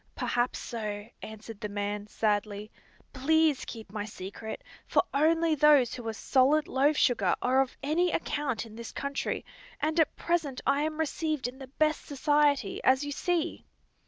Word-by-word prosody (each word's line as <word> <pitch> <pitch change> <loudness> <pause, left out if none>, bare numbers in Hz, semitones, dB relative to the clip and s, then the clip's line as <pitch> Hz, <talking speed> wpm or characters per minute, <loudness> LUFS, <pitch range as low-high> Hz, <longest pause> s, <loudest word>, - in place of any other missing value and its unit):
"Perhaps 240 +1 0
so," 210 -2 -5
answered 220 0 -9
the 210 - -3
man, 205 0 -3
sadly. 210 -1 -1 0.4
"Please 310 +1 +2
keep 220 -4 -9
my 210 -1 -3
secret, 210 - -7 0.2
for - - +3
only 325 +3 +3
those 295 -4 +5
who 240 -3 -6
are - - 0
solid 275 +6 +3
loaf 285 +3 +2
sugar 205 -8 +3
are 260 +2 +3
of 265 - -3
any 335 +5 +2
account 290 -8 -2
in 220 -1 -12
this 235 0 -7
country, 280 0 -3 0.3
and 310 +3 0
at 320 - +3
present 325 -6 -1
I 280 +1 +3
am 310 0 -2
received 310 -3 -1
in 255 +2 -9
the 265 - -8
best 305 +3 0
society, 285 -5 +1
as 260 +2 +4
you 290 - -4
see." 345 +2 -1
265 Hz, 160 wpm, -29 LUFS, 220-305 Hz, 0.4 s, those